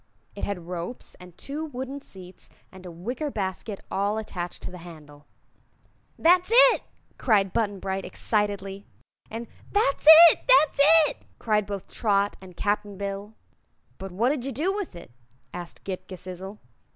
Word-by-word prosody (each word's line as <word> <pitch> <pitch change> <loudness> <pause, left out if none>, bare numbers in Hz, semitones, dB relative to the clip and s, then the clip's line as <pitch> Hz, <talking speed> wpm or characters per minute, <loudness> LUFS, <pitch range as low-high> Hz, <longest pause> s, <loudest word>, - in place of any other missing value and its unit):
It 200 - -8
had 185 -4 -5
ropes 180 +7 -6
and 180 -1 -14
two 295 +3 -5
wooden 270 -1 -6
seats 185 -6 -13 0.2
and 185 -1 -12
a - - -8
wicker 240 - -4
basket 200 -2 -4
all 200 +2 0
attached 180 -5 -6
to - - -6
the 180 - -10
handle. 150 -4 -13 0.9
"That's 355 +3 +4
it!" - - +6 0.4
cried 200 -6 +2
Button 205 -4 -1
Bright, 190 0 -3
excitedly; 200 -2 -2 0.4
and 230 +2 -6 0.3
"That's 355 -8 +1 0.2
it!" - - -4
"That's 310 - +5 0.3
it!" - - -6 0.2
cried 210 -3 0
both 200 -2 -6
Trot 205 -2 0
and 185 -2 -13
Cap'n 205 -1 -1
Bill. 200 +2 -5 0.6
"But 195 0 -7
what 225 +8 +1
did 280 -3 -1
you 275 - -3
do 320 +10 0
with 400 - -5
it?" 170 - -12 0.4
asked 175 -1 -8
Ghip 185 -1 -6
Ghisizzle. 185 +2 -8
200 Hz, 150 wpm, -25 LUFS, 185-245 Hz, 0.9 s, it